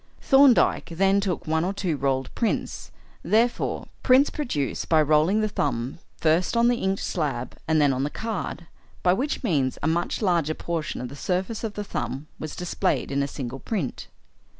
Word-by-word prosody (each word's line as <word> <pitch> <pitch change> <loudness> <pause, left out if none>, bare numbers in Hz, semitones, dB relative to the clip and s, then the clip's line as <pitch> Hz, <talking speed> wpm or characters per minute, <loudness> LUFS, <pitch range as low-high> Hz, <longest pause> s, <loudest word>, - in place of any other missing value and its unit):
Thorndyke 270 -7 +4
then 195 +3 +3
took 190 -4 -2
one 160 +1 +1
or 185 +3 -1
two 185 -5 -1
rolled 135 -2 -1
prints, 230 - -2 0.3
i.e. 230 +3 +1 0.2
prints 260 +2 +5
produced 195 - -2
by 160 - +5
rolling 155 +7 +3
the 215 - +1
thumb 140 - -2 0.2
first 170 +7 +2
on 235 +1 +5
the 245 - +2
inked 190 -1 -1
slab 140 -7 -2
and 160 0 +3
then 145 -2 +4
on 130 - -1
the 145 - -1
card, 215 -3 -4 0.4
by 180 - +5
which 270 +10 -2
means 140 - +1
a - - +2
much 170 +6 -1
larger 170 -5 +1
portion 165 -6 -3
of 125 - -5
the 140 - -9
surface 185 +8 -2
of 220 -2 -4
the 210 - -3
thumb 140 -7 -4
was 155 - -6
displayed 180 -3 -1
in 140 0 +1
a 140 - 0
single 135 -2 -6
print. 185 - -3
170 Hz, 180 wpm, -25 LUFS, 145-210 Hz, 0.4 s, prints